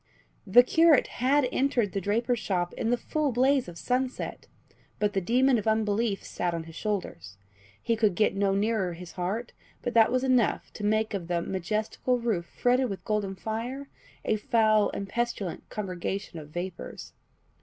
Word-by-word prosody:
The 240 +6 +8
curate 320 +2 +5 0.2
had 270 +1 +3
entered 245 -7 +1
the 195 - -2
draper's 230 +5 0
shop 180 -4 -1
in 225 - -2
the 245 - +2
full 300 +3 -1
blaze 260 +1 +2
of 170 -1 -9
sunset, 255 +6 -2 0.5
but 210 -1 0
the 195 - +1
demon 250 +5 +3
of 215 - -5
unbelief 220 -1 +1
sat 175 -1 -2
on 165 - -4
his 165 0 -12
shoulders; 135 - -4 0.5
he 230 - +1
could 215 -4 +2
get 210 0 +2
no 195 0 +1
nearer 205 -3 0
his 175 +1 -9
heart, 200 +6 -3 0.3
but 245 - -2
that 225 -1 +5
was 255 0 +1
enough 255 -4 +1
to 210 - -8
make 215 +1 +1
of 185 -4 -3
the 175 -1 0
"majestical 215 +7 -1
roof 220 -8 -1
fretted 250 +1 +1
with 195 - -6
golden 210 -3 -1
fire.... 235 +8 -4 0.4
a 215 - +2
foul 215 -1 +3
and 200 - -5
pestilent 235 -5 -3
congregation 190 -2 -4
of 150 -1 -11
vapours." 175 +3 -6
215 Hz, 170 wpm, -28 LUFS, 190-245 Hz, 0.5 s, The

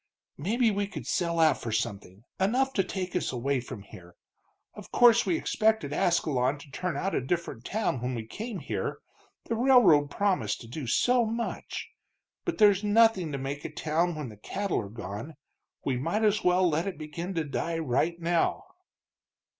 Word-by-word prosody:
"Maybe 225 - +2
we 200 0 -1
could - - -7
sell 170 -1 0
out 155 -4 +4
for 115 - -4
something, 105 -2 -3 0.2
enough 255 +8 +2
to 195 - +2
take 185 -1 -4
us 180 - 0
away 130 +2 0
from 110 -4 -8
here. 90 -4 -14 0.6
Of - - -12
course 240 -1 +6
we 335 - +2
expected 220 - +1
Ascalon 145 -5 +1
to 145 -1 -14
turn 180 +5 -3
out 195 +1 -1
a - - +1
different 135 -4 -3
town 205 - -1
when 125 +1 -2
we 115 -2 -5
came 215 - -6
here, - - -3 0.5
the - - -2
railroad 220 - +5
promised 180 - 0
to 115 - -10
do 130 +2 -6
so 245 - +3
much. 230 - -4 0.6
But 350 - -2
there's 205 -2 +5
nothing 210 -5 +4
to 140 - -2
make 140 +2 -4
a - - -4
town 165 +2 0
when 150 -5 -5
the 105 - -12
cattle 195 - -2
are 100 - -8
gone. 110 - -7 0.5
We 130 -2 0
might 170 - -1
as 210 -1 +2
well 180 0 +4
let 165 +3 0
it 190 - -4
begin 165 +4 -6
to 165 - 0
die 165 +3 -2
right 160 +3 0
now." 170 0 +1
170 Hz, 180 wpm, -28 LUFS, 135-205 Hz, 0.6 s, course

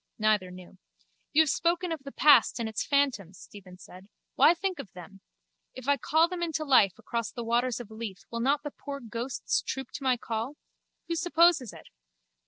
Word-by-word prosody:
Neither 215 -4 +1
knew. 180 0 -13 0.5
You 315 +1 +5
have 310 - 0
spoken 345 +1 0
of 320 -3 -4
the 275 0 -9
past 295 -4 +5
and 230 - -2
its 220 -1 -3
phantoms, 255 - 0
Stephen 185 -3 -13
said. 185 +2 -14 0.2
Why 335 - +5
think 375 +1 -3
of 190 - -8
them? 180 +2 -12 0.5
If 255 0 -9
I 285 0 +3
call 315 +6 +2
them 360 0 -6
into 325 -2 -2
life 230 - +4
across 235 -2 -4
the 240 - -6
waters 240 +1 0
of 230 -3 -10
Lethe 220 -4 -7
will 230 - -3
not 280 +4 +1
the 295 - -5
poor 280 0 -7
ghosts 235 +1 -3
troop 265 -2 -5
to 280 - -8
my 255 -2 +2
call? 230 +4 -4 0.5
Who 335 - -2
supposes 335 - +3
it? - - -14
255 Hz, 190 wpm, -28 LUFS, 215-300 Hz, 0.5 s, You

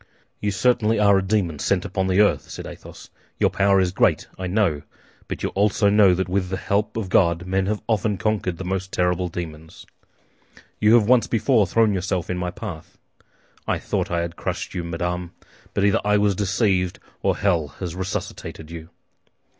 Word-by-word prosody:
"You 105 - -1
certainly 115 +2 +2
are 100 -2 +5
a - - -1
demon 95 -6 -1
sent 95 +3 0
upon 95 0 -1
the 95 +2 +4
earth!" 105 - +2
said - - -7
Athos. - - -11 0.3
"Your - - +2
power 100 0 +3
is 90 -1 +1
great, - - +2
I 95 - -5
know; 90 -6 +1 0.5
but - - -5
you - - 0
also 100 0 +2
know 100 -3 +5
that 95 0 -1
with 90 0 -1
the 95 - -2
help 100 +4 -1
of 110 -4 -2
God 85 -2 +2
men 95 +1 0
have 105 +1 -2
often 105 -2 0
conquered 95 -4 -1
the 95 - -6
most 95 +1 -3
terrible 90 0 0
demons. 80 -2 -8 0.9
You 110 +2 +5
have 110 -3 +4
once 120 -2 +4
before 110 -2 +2
thrown 110 +3 +3
yourself 90 -2 -2
in 90 - -2
my 90 0 -2
path. 90 -3 -8 0.7
I - - +1
thought - - -2
I 85 -1 0
had 85 0 -4
crushed - - -4
you, 85 - -3
madame; 90 +1 -3 0.4
but 100 - +2
either 100 - +3
I 105 0 +3
was 105 -1 +2
deceived 95 -2 0 0.2
or - - +1
hell 85 -7 +1
has 85 +4 -7
resuscitated 90 -3 -5
you!" 80 -1 -9
95 Hz, 185 wpm, -23 LUFS, 90-105 Hz, 0.9 s, are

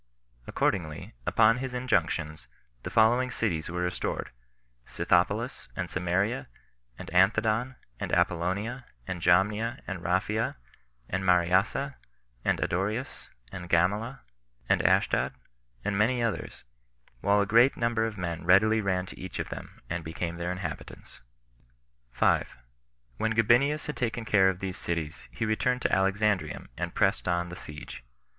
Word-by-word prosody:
Accordingly, 80 -6 -1
upon 115 +2 +4
his 130 -1 -4
injunctions, 80 - -1 0.3
the - - -5
following 120 +3 +4
cities 90 -11 -1
were 90 +1 -3
restored: 90 - -3 0.5
Scythopolis, - - 0
and - - -4
Samaria, 95 +8 0 0.5
and - - -9
Anthedon, 110 +7 +3 0.2
and - - -3
Apollonia, 100 +9 0 0.2
and 90 +3 -5
Jamnia, 105 +7 +2
and 95 -3 -5
Raphia, 100 +6 0 0.5
and 95 +1 -2
Mariassa, 95 +10 +2 0.5
and - - +1
Adoreus, 105 +9 -2 0.2
and 90 -1 -7
Gamala, 105 +10 +1 0.5
and - - +3
Ashdod, - - +2 0.5
and 105 - 0
many 120 +4 +2
others; 115 -2 -3 0.6
while 100 +9 +3
a 100 - +3
great 115 +6 +5
number 115 -1 +1
of 110 -2 -3
men 85 -2 -4
readily 110 +4 +5
ran 95 -2 0
to - - -11
each 95 - -6
of - - -3
them, - - -9
and 85 0 -3
became 85 +2 -4
their 85 +1 -2
inhabitants. 90 +1 -7 0.9
5. - - +1 0.6
When 110 0 0
Gabinius 125 +7 +3
had 150 - -5
taken 120 -1 -2
care 95 -3 +5
of 95 -1 -4
these 95 -1 -4
cities, 80 -3 -4
he - - -2
returned 125 +3 0
to - - +2
Alexandrium, 100 +1 +1
and - - -4
pressed - - +2
on 85 0 0
the 90 - -7
siege. 75 -6 -9
100 Hz, 135 wpm, -28 LUFS, 90-115 Hz, 0.9 s, great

